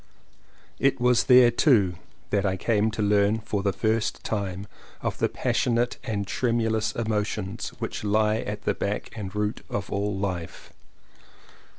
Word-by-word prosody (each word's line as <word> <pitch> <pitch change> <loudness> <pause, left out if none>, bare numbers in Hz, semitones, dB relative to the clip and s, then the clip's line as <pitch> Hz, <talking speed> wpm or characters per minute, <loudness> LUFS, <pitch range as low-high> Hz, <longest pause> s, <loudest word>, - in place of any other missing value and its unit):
It 135 -1 +2
was 125 -1 +3
there 125 -2 +7
too 115 - +4 0.4
that 100 -2 +2
I 95 -1 0
came 110 +2 +1
to 110 0 -2
learn 105 +1 +3
for 105 -2 -3
the 100 0 +1
first 110 +3 -1
time 100 -2 -3 0.4
of - - -2
the - - +2
passionate 120 0 0
and 105 -3 -2
tremu 115 +1 0
lous 110 0 -1
emotions 105 -4 -2
which - - -4
lie 105 +1 +2
at 105 -1 -5
the - - +1
back 100 +2 -3
and 105 -2 -6
root 105 +1 -2
of 100 - -4
all 100 0 -1
life. 90 -4 -5
105 Hz, 155 wpm, -26 LUFS, 100-115 Hz, 0.4 s, there